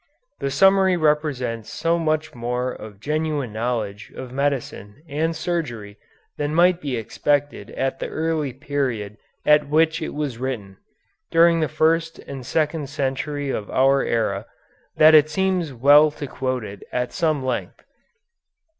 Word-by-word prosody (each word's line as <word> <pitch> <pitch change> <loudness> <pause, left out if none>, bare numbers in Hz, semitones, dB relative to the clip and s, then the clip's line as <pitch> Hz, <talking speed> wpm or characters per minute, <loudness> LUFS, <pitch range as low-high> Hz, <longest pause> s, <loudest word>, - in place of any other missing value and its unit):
The 140 - -1
summary 190 +4 +4
represents 145 -8 0
so 170 +1 0
much 155 -1 -1
more 125 +1 -2
of 105 -4 -10
genuine 150 -2 -2
knowledge 110 -3 -3
of 130 -2 -7
medicine 140 -4 -3
and 160 +3 -1
surgery 120 -14 -4 0.4
than 145 +1 -2
might 175 +1 +4
be 135 -4 -2
expected 145 +6 -1
at 135 0 -1
the - - -3
early 160 -3 -1
period 125 -7 -3 0.3
at 150 -1 +4
which 160 +2 +2
it 155 - -4
was 145 -6 -3
written, 110 -7 -4 0.5
during 165 0 +5
the 155 - +1
first 165 +3 +1
and 135 -2 -8
second 150 +1 -1
century 140 0 -2
of 105 -4 -4
our 135 +1 +3
era, 110 -3 -1 0.5
that 155 +1 +7
it 155 -1 +7
seems 185 -2 0
well 145 +5 +6
to 145 -1 -7
quote 130 -2 -3
it 100 -1 -9
at 125 0 -2
some 155 -6 0
length. 125 -2 -4
145 Hz, 145 wpm, -22 LUFS, 125-155 Hz, 0.5 s, that